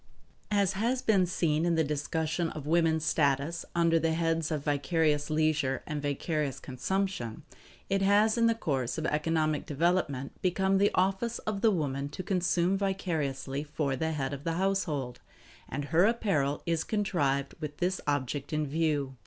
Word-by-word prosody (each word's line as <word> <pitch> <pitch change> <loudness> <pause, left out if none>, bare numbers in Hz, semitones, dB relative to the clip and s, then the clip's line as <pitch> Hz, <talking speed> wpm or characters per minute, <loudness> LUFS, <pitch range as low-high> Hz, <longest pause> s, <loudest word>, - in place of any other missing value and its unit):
As 200 -2 +2
has 235 +6 0
been 195 -5 +3
seen 160 -3 +1
in 170 -1 +2
the 160 - +3
discussion 160 +3 -1
of 155 -3 -7
woman's 160 0 +2
status 150 +2 +1
under 165 -1 +3
the 160 0 +1
heads 165 -1 0
of 150 -3 -2
Vicarious 150 0 +1
Leisure 155 -4 +1
and 150 -1 -4
Vicarious 145 -1 -2
Consumption, 135 - -3 0.4
it 195 0 +1
has 205 +3 +4
in 230 -1 +3
the 230 - +3
course 135 - -2
of 160 - -2
economic 155 -1 0
development 150 -3 0
become 190 +1 +2
the 200 - +4
office 195 +6 +1
of 210 -2 -2
the 225 - +5
woman 140 -7 -1
to 185 - -6
consume 180 0 +1
vicariously 155 -8 -2
for 145 -2 -2
the 160 +4 -1
head 140 -2 -2
of 140 0 -6
the 165 - -1
household; 165 -9 -1 0.5
and 145 +1 -3
her 165 +5 +4
apparel 180 -11 +1
is 165 -1 0
contrived 165 -10 0
with 150 -2 -6
this 185 +1 -1
object 145 0 -1
in 155 -1 0
view. 145 -3 -1
160 Hz, 160 wpm, -29 LUFS, 145-185 Hz, 0.5 s, the